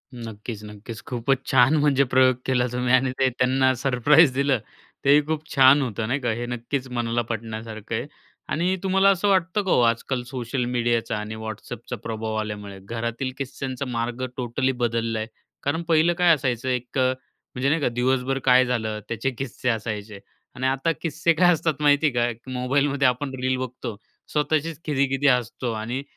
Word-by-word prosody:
नक्कीच, 110 -2 -7
नक्कीच. 105 +1 -9
खूपच 130 +2 -1
छान. 130 +3 +5
म्हणजे 145 -2 +3
प्रयोग 130 -1 +5
केला 125 -2 +2
तुम्ही 125 0 0
आणि 130 0 +4
ते 130 -1 +4
त्यांना 130 +1 +2
सरप्राइज 135 +4 +4
दिलं, 140 -1 +1 0.5
तेही 145 +2 +6
खूप 155 0 -3
छान 135 +2 +7
होतं 115 -3 -2
नाही 130 +5 0
का? 120 -3 -1
हे 120 +2 -3
नक्कीच 125 +3 -3
मनाला 120 -1 0
पटण्यासारखं 110 -1 -5
आहे. - - -3 0.4
आणि 175 +4 +1
तुम्हाला 195 +1 +4
असं 195 +1 +2
वाटतं 190 +1 +2
का 190 - -1
हो, - - +4
आजकाल 120 +2 0
सोशल 125 0 -3
मीडियाचा 120 -2 0
आणि 105 +1 -5
WhatsAppचा 110 +2 -7
प्रभाव 110 -1 -3
आल्यामुळे, 105 -2 -6
घरातील 115 +4 -3
किस्स्यांचा 135 0 -4
मार्ग 120 +1 -3
टोटली 130 +2 0
बदलला 115 -1 0
आहे? 110 - -3 0.4
कारण 160 +4 0
पहिलं 165 +1 +4
काय 175 -2 +5
असायचं 130 -2 -2
1 125 +1 -3
अ, - - +4 0.5
म्हणजे 130 +2 +1
नाही 160 +1 +1
का? - - +2
दिवसभर 130 +2 0
काय 130 +1 +6
झालं, 110 -3 -2
त्याचे 115 +3 -1
किस्से 130 -1 -3
असायचे 110 -2 -3 0.4
आणि 130 0 -1
आता 135 +5 +1
किस्से 165 +1 +1
काय 175 +2 +5
असतात 155 -2 -1
माहिती 145 0 +4
आहे 120 0 +2
का, 120 +4 -15
मोबाईलमध्ये 135 +2 +1
आपण 130 +2 -1
रील 130 0 +1
बघतो, 125 -3 -5 0.4
स्वतःशीच 155 +1 0
खिदी-खिदी 140 -1 +1
हसतो 125 -1 +1
आणि 120 +5 -4
125 Hz, 170 wpm, -24 LUFS, 115-140 Hz, 0.5 s, छान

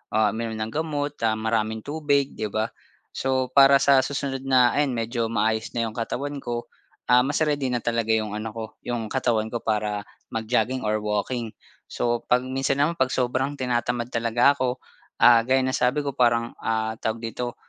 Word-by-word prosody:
ah, 110 -2 +3
uminom 115 0 -4
ng 110 +1 -3
gamot, 150 -1 -2
ah, 110 - +1
maraming 110 0 -1
tubig, 145 -2 0
'di 110 - -1
ba? 110 +2 -2 0.4
So, 130 -1 0
para 140 0 +7
sa 140 -1 +6
susunod 135 -1 -3
na 125 -2 +5
ayan 145 -1 +2
medyo 115 0 -1
maayos 110 +1 0
na 115 -1 0
yung 110 - -8
katawan 140 +5 -3
ko, 120 -1 -4 0.4
ah, 125 0 +5
mas 145 +3 -1
ready 145 -4 0
na 120 - 0
talaga 115 -1 -1
yung 110 -2 0
ano 110 +1 -4
ko, 115 +1 -6 0.2
yung 120 -2 -3
katawan 115 -3 0
ko 120 +1 -5
para 105 -1 -1 0.3
mag-jogging 115 +3 0
or 110 0 0
walking. 105 +2 -2 0.3
So, 120 -1 -2
'pag 125 0 +3
minsan 135 +2 0
naman 165 +3 -1
'pag 130 - +3
sobrang 130 +3 0
tinatamad 120 -2 -1
talaga 115 +3 +3
ako, 130 -2 -2 0.4
ah, 120 -1 +8
gaya 130 0 +3
ng 130 - 0
sabi 125 +4 +1
ko 140 - -2
parang, 120 -3 +2
ah 110 0 -2
tawag 110 +1 -3
dito 120 +1 -4
120 Hz, 185 wpm, -24 LUFS, 110-130 Hz, 0.4 s, ah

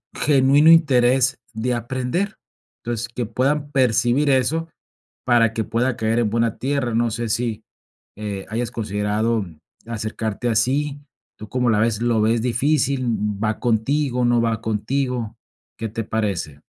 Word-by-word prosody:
genuino 145 +2 +5
interés 130 -5 +4 0.2
de 120 +3 -1
aprender. 130 - -2 0.5
Entonces, 120 -1 -3
que 120 0 -3
puedan 145 +6 -1
percibir 125 +1 +2
eso 140 +5 +1 0.6
para 115 -3 +3
que 115 - -1
pueda 120 +2 0
caer 110 +1 0
en 115 -3 +1
buena 115 -1 0
tierra. 135 -3 -1
No 115 0 +1
sé 115 0 -3
si, 115 -1 -2 0.5
eh, 100 -2 -5
hayas 115 +1 -2
considerado 105 0 -1 0.4
acercarte 110 +1 -3
así. 140 +6 0 0.4
¿Tú 110 - -9
como 125 -1 +1
la 105 -2 +3
ves? 115 -1 +1
¿Lo 120 -2 +2
ves 115 +1 +2
difícil? 135 +2 +1 0.4
¿Va 110 0 -1
contigo? 125 +2 +1
¿No 120 -1 +3
va 115 -2 0
contigo? 115 +1 -2 0.4
¿Qué 115 - -2
te 115 +1 -4
parece? 100 -10 -3
120 Hz, 140 wpm, -21 LUFS, 110-130 Hz, 0.6 s, genuino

